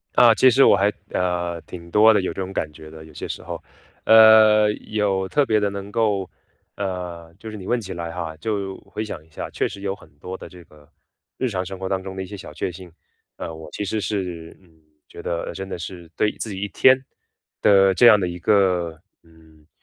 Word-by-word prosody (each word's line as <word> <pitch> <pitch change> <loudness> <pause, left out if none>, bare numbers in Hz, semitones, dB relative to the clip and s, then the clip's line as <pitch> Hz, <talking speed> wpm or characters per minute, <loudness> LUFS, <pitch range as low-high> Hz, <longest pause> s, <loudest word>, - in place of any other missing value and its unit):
啊， - - +7
其 130 - +5
实 130 +3 +5
我 - - +7
还 100 +1 +2 0.2
呃， 85 -2 -1
挺 85 0 -11
多 110 +3 +6
的 105 - +2
有 95 - -3
这 - - -5
种 95 0 -5
感 80 -5 -3
觉 80 +1 -12
的， 80 0 -12
有 80 - -15
些 - - -6
时 - - -6
候。 - - -6 0.4
呃， 110 -1 +7 0.2
有 100 -3 0
特 145 -1 +2
别 110 -3 +2
的 105 -1 0
能 100 0 -7
够 105 -5 0 0.5
呃， 90 -4 -5
就 110 - -9
是 110 - -7
你 95 -2 -9
问 120 - +1
起 95 -4 -7
来 85 -1 -5
哈， 85 -2 -5
就 100 +1 -3
回 110 - -4
想 90 -7 -7
一 80 - -26
下 75 - -6
确 - - -1
实 100 - -10
有 100 -1 -2
很 - - -18
多 90 +5 -7
的 - - -10
这 90 -2 -14
个 75 -2 -21 0.5
日 130 - 0
常 95 -6 -2
生 95 +1 -7
活 95 0 -5
当 95 0 -1
中 95 0 -8
的 95 - -4
一 - - -7
些 100 - -9
小 95 - -10
确 90 - -3
幸。 90 0 -12 0.5
呃， 80 - -6
我 80 -1 -10
其 105 - -4
实 110 +2 -2
是 90 -4 -4
嗯， 80 -4 -26 0.3
觉 - - -11
得 85 - -3
真 95 0 -7
的 - - -4
是 85 0 -8
对 105 - +1
自 110 - -3
己 95 -2 -5
一 105 - -2
天 130 +4 +5 0.6
的 95 -1 +5
这 120 +6 +6
样 105 -3 +8
的 90 - -1
一 90 0 -6
个， 90 -4 +1 0.2
嗯， 80 -2 -22
95 Hz, 250 characters per minute, -22 LUFS, 85-105 Hz, 0.6 s, 样